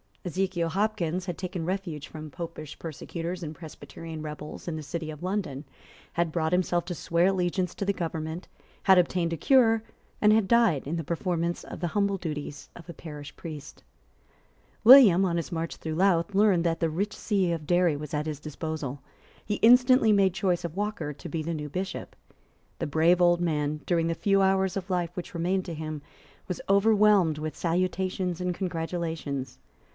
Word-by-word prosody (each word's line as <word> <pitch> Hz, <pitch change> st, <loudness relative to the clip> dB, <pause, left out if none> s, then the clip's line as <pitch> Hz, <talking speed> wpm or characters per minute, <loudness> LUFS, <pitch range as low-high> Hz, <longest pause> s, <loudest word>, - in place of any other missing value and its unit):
Ezekiel 180 Hz, -1 st, -1 dB
Hopkins 185 Hz, -2 st, -1 dB
had 175 Hz, -3 st, -4 dB
taken 180 Hz, -2 st, -4 dB
refuge 175 Hz, -5 st, -3 dB
from 155 Hz, -1 st, -8 dB
Popish 165 Hz, -1 st, -7 dB
persecutors 170 Hz, +2 st, -5 dB
and 160 Hz, -2 st, -6 dB
Presbyterian 160 Hz, 0 st, -9 dB
rebels 150 Hz, +1 st, -8 dB
in 165 Hz, -, -2 dB
the 155 Hz, -, -4 dB
city 155 Hz, +2 st, -4 dB
of 150 Hz, 0 st, -10 dB
London, 180 Hz, -7 st, -3 dB, 0.5 s
had 170 Hz, -1 st, 0 dB
brought 160 Hz, -1 st, 0 dB
himself 180 Hz, -1 st, +1 dB
to 175 Hz, -, -4 dB
swear 170 Hz, +2 st, +1 dB
allegiance 180 Hz, -1 st, 0 dB
to 200 Hz, -, -3 dB
the 200 Hz, -, +1 dB
government, 165 Hz, -1 st, -4 dB, 0.4 s
had 190 Hz, -2 st, +6 dB
obtained 175 Hz, -1 st, +2 dB
a -, -, -3 dB
cure, 225 Hz, -, +4 dB, 0.4 s
and 210 Hz, 0 st, +5 dB
had 215 Hz, -3 st, +3 dB
died 225 Hz, -, +3 dB
in 160 Hz, -, -2 dB
the 165 Hz, -, -2 dB
performance 170 Hz, +1 st, -2 dB
of -, -, -8 dB
the 175 Hz, -, -1 dB
humble 200 Hz, -1 st, +2 dB
duties 150 Hz, -4 st, -6 dB
of 170 Hz, -2 st, -12 dB
a -, -, -6 dB
parish 145 Hz, -3 st, -9 dB
priest, 155 Hz, -4 st, -9 dB, 1.0 s
William, 220 Hz, -7 st, +9 dB
on 170 Hz, -2 st, 0 dB
his 170 Hz, -, -3 dB
march 165 Hz, -1 st, -3 dB
through 160 Hz, -1 st, -5 dB
Louth, 185 Hz, +1 st, +2 dB
learned 195 Hz, -4 st, +4 dB
that 165 Hz, -1 st, 0 dB
the 165 Hz, -, +1 dB
rich 195 Hz, +7 st, -2 dB
see 195 Hz, -5 st, 0 dB
of 160 Hz, -3 st, -4 dB
Derry 175 Hz, -3 st, +3 dB
was 150 Hz, 0 st, -7 dB
at 150 Hz, +1 st, -1 dB
his 150 Hz, -2 st, -4 dB
disposal. 150 Hz, -2 st, -5 dB, 0.4 s
He 210 Hz, -, -1 dB
instantly 250 Hz, 0 st, +6 dB
made 195 Hz, -3 st, +4 dB
choice 185 Hz, -4 st, 0 dB
of 170 Hz, -1 st, -5 dB
Walker 200 Hz, -7 st, -3 dB
to -, -, -9 dB
be 160 Hz, -2 st, -3 dB
the 165 Hz, +2 st, -3 dB
new 150 Hz, -2 st, -5 dB
Bishop. 190 Hz, +5 st, -5 dB, 0.6 s
The -, -, -2 dB
brave 165 Hz, +4 st, +3 dB
old 175 Hz, 0 st, +4 dB
man, 150 Hz, -3 st, -1 dB
during 170 Hz, -2 st, +1 dB
the 165 Hz, -, -1 dB
few 195 Hz, +2 st, +2 dB
hours 190 Hz, -1 st, +2 dB
of 195 Hz, -1 st, -4 dB
life 175 Hz, -1 st, -1 dB
which 180 Hz, -, -6 dB
remained 180 Hz, +3 st, 0 dB
to 170 Hz, -, -5 dB
him, 155 Hz, -1 st, -5 dB, 0.5 s
was 180 Hz, -, -4 dB
overwhelmed 200 Hz, -5 st, +4 dB
with 155 Hz, 0 st, -4 dB
salutations 180 Hz, +1 st, -1 dB
and 180 Hz, 0 st, -1 dB
congratulations. 165 Hz, -7 st, -4 dB
170 Hz, 180 wpm, -27 LUFS, 160-190 Hz, 1.0 s, William